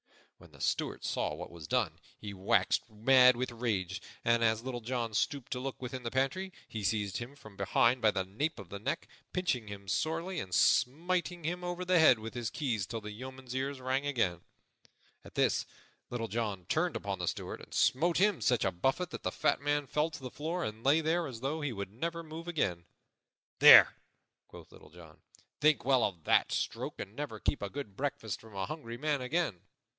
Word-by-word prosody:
When - - -16
the - - -16
Steward - - -1
saw 75 - -1
what 90 +3 -8
was 85 -3 -9
done, - - 0 0.2
he 105 -1 -7
waxed 95 +4 +1
mad 125 +4 +6
with 125 +1 -2
rage; 100 -6 -2 0.2
and, 115 0 +3
as 110 0 +2
Little 125 -2 -4
John 115 -1 -2
stooped 130 +4 -1
to 125 - -1
look 135 +1 -5
within 130 0 -5
the 120 - -3
pantry, 135 +10 -1 0.2
he 110 -2 -5
seized 100 0 0
him 120 +4 -7
from 110 -7 -14
behind 115 +6 +2
by 110 - +5
the 95 -2 -1
nape 140 +12 -2
of 100 -5 -10
the 100 - -6
neck, - - -3 0.3
pinching 160 -12 0
him 100 -1 -8
sorely 165 - -1
and 95 - -6
smiting 175 +6 +2
him 175 +3 -2
over 175 +1 -3
the 180 -1 +4
head 145 -6 +7
with 110 +1 -7
his 120 -2 -3
keys 115 - -2
till 115 +2 -4
the 105 0 -7
yeoman's 130 +3 -8
ears 135 +1 -2
rang 130 +2 -1
again. 95 - 0 0.8
At - - -14
this - - +2 0.4
Little 115 -2 -3
John 105 -6 -3
turned - - 0
upon - - -3
the - - -2
Steward - - -4
and - - -14
smote 165 +6 +2
him 205 -1 +3
such 125 -4 +2
a 95 - +2
buffet 135 - 0
that - - -6
the - - -2
fat - - +1
man 145 0 +1
fell 150 +4 0
to 145 -4 -10
the 130 - -5
floor 165 +4 -3
and 110 -2 -5
lay 145 +4 +4
there 165 +2 +1
as 120 -4 -8
though 150 +4 -2
he 145 -2 -1
would 100 -3 -5
never 170 +7 -3
move 165 +2 -8
again. 90 - -1 0.7
"There," - - +10 0.5
quoth - - -13
Little - - -15
John, 80 -1 -15 0.4
"think 150 -4 +3
well 130 -2 +4
of 90 -6 -2
that - - +3
stroke - - -3
and 100 - -7
never 145 +1 -5
keep - - -1
a 100 - -3
good 120 -5 -7
breakfast 130 -6 -3
from 110 -3 -14
a 95 -1 -1
hungry 120 -5 -6
man 145 0 0
again." 125 - -1
125 Hz, 205 wpm, -32 LUFS, 105-150 Hz, 0.8 s, There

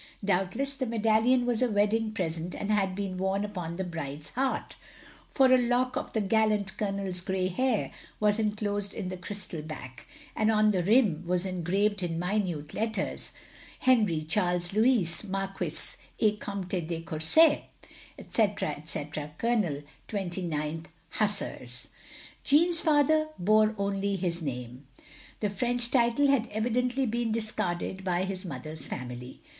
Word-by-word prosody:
Doubtless 195 +9 +1
the 260 -2 -3
medallion 225 +3 +3
was 245 -1 0
a 250 - +3
wedding 215 +1 +2
present 170 -4 -3
and 205 - -2
had 195 -3 +1
been 190 -2 -3
worn 190 +2 0
upon 180 -5 -5
the 190 - -2
bride's 150 -4 -5
heart; 265 +1 -1 0.5
for 260 -2 +4
a 255 - +6
lock 250 +1 +1
of - - -4
the 220 - +1
gallant 210 -1 +1
Colonel's 195 -3 -2
grey 185 0 -1
hair 245 +4 0 0.3
was 210 0 +2
enclosed 205 -2 -1
in 195 -4 -3
the 185 - -5
crystal 180 -3 -5
back, 130 -5 -9 0.3
and 215 - +2
on 215 -1 +4
the 185 -3 +1
rim 200 -5 +3
was 180 +1 +1
engraved 190 +3 0
in 170 -2 -1
minute 180 -5 -1
letters, 220 -3 -2 0.5
"Henri 215 -11 +3
Charles 175 +1 +1
Loxiis, 215 -6 +3
Marquis 195 -1 -3 0.2
et 210 -2 +2
Comte 185 -4 -3
de 165 -1 -2
Courset, 165 - +4 0.5
etc, 210 -7 0
etc., 150 0 -4
Col. 210 -12 0 0.3
29th 170 -5 -3 0.3
Hussars." 165 - -1 0.5
Jeanne's 330 +4 +4
father's 310 0 +4
bore 215 +3 +4
only 200 0 0
his 175 -2 -2
name. 125 -2 -5 0.5
The 210 -2 0
French 240 +3 +1
title 240 +2 +3
had 275 -4 +3
evidently 245 +4 0
been 235 0 -1
discarded 190 -4 -2
by 180 -1 +1
his 190 0 -4
mother's 155 +1 -6
family. 125 -1 -7
200 Hz, 140 wpm, -29 LUFS, 175-225 Hz, 0.5 s, a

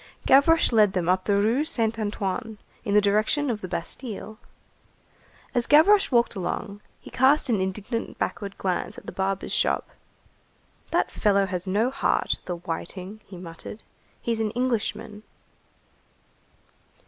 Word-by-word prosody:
Gavroche 285 +4 +5
led 210 -4 +4
them 180 -3 -1
up 185 +1 +2
the 200 - +2
Rue 225 +8 +2
Saint 230 -8 -1
Antoine 215 +1 -3 0.3
in 205 - 0
the 210 - +7
direction 215 +8 +1
of 215 -2 -4
the 185 - -5
Bastille. 215 +4 -5 1.1
As 240 -1 +1
Gavroche 385 +7 +6
walked 235 -1 +3
along, 200 +1 -4 0.2
he - - -13
cast 265 +2 +3
an 210 -4 +2
indignant 205 +5 -3
backward 200 -2 -4
glance 185 -2 -2
at - - -11
the - - -6
barber's 195 0 -2
shop. - - 0 1.0
"That - - +1
fellow 200 -1 +2
has 185 -1 -4
no 215 +7 +1
heart, 275 - 0
the 180 - -3
whiting,"35 180 +4 -6
he 190 - -10
muttered. 175 +5 -9 0.4
"He's 230 -1 -2
an 220 -1 0
Englishman." 220 -4 -2
210 Hz, 140 wpm, -25 LUFS, 190-235 Hz, 1.1 s, the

